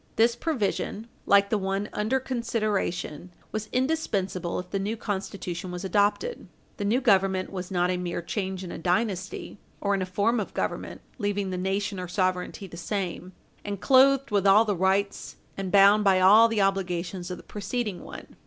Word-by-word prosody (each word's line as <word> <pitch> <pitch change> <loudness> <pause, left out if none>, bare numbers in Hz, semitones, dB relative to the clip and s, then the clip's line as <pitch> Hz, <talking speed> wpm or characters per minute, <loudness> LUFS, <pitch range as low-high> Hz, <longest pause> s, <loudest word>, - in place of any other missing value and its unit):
This 230 +1 +4
provision, 230 -6 -2 0.2
like 200 0 +5
the 215 - +2
one 195 +1 -2
under 220 +6 0
consideration, 215 - -2 0.2
was 215 0 -4
indispensable 210 - -1
if 180 0 -6
the 195 - -1
new 210 +4 -2
Constitution 190 -4 -4
was 180 +1 -5
adopted. 205 - 0 0.3
The 205 - -3
new 225 +5 +2
Government 195 -5 +2
was 185 -2 -5
not 180 -1 +1
a 180 - -1
mere 175 -1 -3
change 190 0 -3
in 180 - -7
a - - -6
dynasty, 185 +2 -2 0.2
or 200 0 0
in 195 - 0
a 185 - -2
form 210 +5 +1
of 205 - -5
government, - - -3 0.2
leaving 205 -2 -1
the - - -2
nation 195 +2 -2
or 180 - -4
sovereignty 185 +1 -1
the 170 -2 -10
same, 185 -1 -4 0.3
and 200 -2 -4
clothed 270 +5 +4
with 200 -1 +2
all 210 +3 +6
the 205 -2 0
rights, 190 +2 0 0.2
and 195 -2 -4
bound 200 +1 +6
by 190 -2 +4
all 210 +5 +7
the 225 -2 0
obligations 180 -2 -1
of 180 - -5
the - - -13
preceding 210 -1 -4
one. - - -11
195 Hz, 180 wpm, -26 LUFS, 185-215 Hz, 0.3 s, all